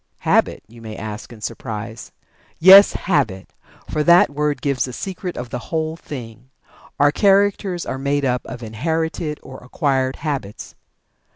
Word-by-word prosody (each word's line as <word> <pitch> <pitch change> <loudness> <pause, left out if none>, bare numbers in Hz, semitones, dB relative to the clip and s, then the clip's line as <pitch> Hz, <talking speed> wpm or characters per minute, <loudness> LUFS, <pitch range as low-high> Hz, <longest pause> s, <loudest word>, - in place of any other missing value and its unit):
"Habit?" - - +1
you 115 +1 -15
may 110 -1 -8
ask 105 +2 -7
in 115 -2 -13
surprise. 110 0 -6 0.5
Yes, 190 +4 +9
Habit! 130 - -1 0.3
For 150 - -1
that 170 -1 +6
word 150 0 -1
gives 140 -3 0
the 125 - -8
secret 185 +3 -6
of 120 -1 -6
the 125 - -3
whole 160 -1 -2
thing. 125 -6 -10 0.5
Our 145 +1 +5
characters 195 -1 +2
are 130 - -4
made 140 +1 0
up 125 -1 0
of 120 -2 -8
inherited 160 +6 -3
or 130 0 -10
acquired 130 0 -1
habits. 135 -10 -5
140 Hz, 150 wpm, -20 LUFS, 120-160 Hz, 0.5 s, Yes